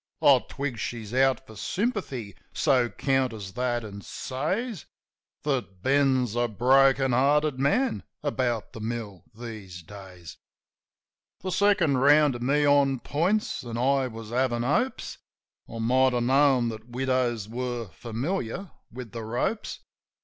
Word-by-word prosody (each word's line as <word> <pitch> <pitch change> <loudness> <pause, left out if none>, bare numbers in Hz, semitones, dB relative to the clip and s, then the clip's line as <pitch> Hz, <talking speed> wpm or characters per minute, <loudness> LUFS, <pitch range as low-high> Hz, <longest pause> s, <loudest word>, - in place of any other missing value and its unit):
I - - +7
twig 135 -5 -4
she's 110 -1 -5
out 135 0 +2
for 110 - -13
sympathy; 140 - -3 0.2
so 125 -3 +2
counters 125 -9 -1
that, 120 -1 -1
an' 100 -1 -8
says 180 - -3 0.6
That 120 -10 -2
Ben's 130 -4 +2
a 120 0 +2
broken 135 +4 +4
hearted 140 +2 +2
man 230 - +1 0.2
about 125 -6 -1
the - - -8
mill 110 -5 -5
these 105 -7 -8
days. 90 -2 -11 1.0
The 185 - -3
second 180 -9 +3
round 145 +1 +5
to 120 - -6
me 140 +4 +2
on 140 -2 +4
points; 185 +9 0
an' 115 -2 -5
I 135 +2 +2
was 115 -2 -9
havin' 120 -1 +1
hopes. 150 - -1 0.5
(I 115 - -7
might 130 +3 +3
have 120 -1 +1
known 130 -1 +3
that 110 +1 -9
widows 125 -4 0
were 120 -1 -4
familiar 125 - -4 0.2
with 125 -2 -8
the 115 -1 -6
ropes.) 120 - -2
125 Hz, 135 wpm, -26 LUFS, 115-140 Hz, 1.0 s, I